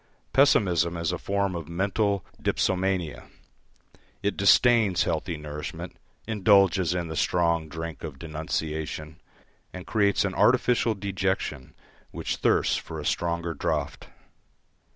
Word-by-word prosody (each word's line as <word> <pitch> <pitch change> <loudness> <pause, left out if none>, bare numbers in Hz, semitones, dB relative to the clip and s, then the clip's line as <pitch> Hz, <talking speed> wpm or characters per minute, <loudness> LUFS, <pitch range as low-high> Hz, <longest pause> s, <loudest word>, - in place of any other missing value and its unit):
Pessimism 90 - +3
is 85 0 -1
a 90 - -3
form 100 -1 -1
of 85 -3 -6
mental 100 +2 0 0.2
dipsomania, 95 -4 -1 1.0
it 100 - 0
disdains 105 -1 +4
healthy 80 +1 -2
nourishment, 75 0 -7 0.3
indulges 100 -5 +3
in 85 -2 -2
the 80 - -6
strong 85 -2 +1
drink 80 0 -6
of 75 -4 -6
denunciation, 80 0 -4 0.5
and 90 -1 -8
creates 100 -2 +2
an 95 - -2
artificial 120 -1 +3
dejection 95 -8 -3 0.3
which - - -4
thirsts - - +2
for - - -7
a - - -6
stronger 85 -1 -1
draught. 75 - -3
90 Hz, 115 wpm, -26 LUFS, 80-100 Hz, 1.0 s, disdains